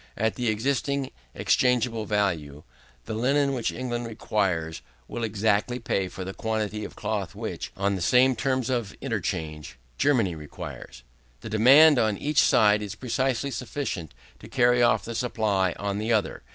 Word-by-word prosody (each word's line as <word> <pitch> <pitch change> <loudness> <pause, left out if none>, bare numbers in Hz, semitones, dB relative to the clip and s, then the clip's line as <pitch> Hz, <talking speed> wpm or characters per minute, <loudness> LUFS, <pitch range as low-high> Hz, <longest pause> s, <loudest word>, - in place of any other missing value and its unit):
At 110 0 +1
the 125 -1 -3
existing 135 +4 -1 0.2
exchangeable 120 -3 +1
value, 85 -9 -1 0.4
the 110 - -5
linen 140 +5 +1
which 120 -3 -1
England 120 -1 -4
requires, 95 -7 -1 0.3
will 120 - -5
exactly 110 +2 +1
pay 100 -5 -1
for 95 +1 -7
the 95 - -5
quantity 110 -1 -2
of - - -8
cloth - - -3
which, - - -5
on 100 +1 +1
the 95 - -3
same 125 +8 +4
terms 130 +1 -1
of 115 -6 -2
interchange, 75 -5 -4 0.2
Germany 115 -11 +2
requires. 75 -5 -9 0.4
The - - -8
demand 135 +7 +7
on 110 -3 +1
each 150 +4 +1
side 105 0 +4
is 105 -1 -5
precisely 130 +3 -1
sufficient 115 - -4 0.2
to - - -12
carry 125 -2 +3
off 110 -4 +3
the 115 - -5
supply 105 -6 0
on 100 0 -2
the 110 +2 -1
other. 110 -4 0
110 Hz, 155 wpm, -26 LUFS, 100-125 Hz, 0.4 s, demand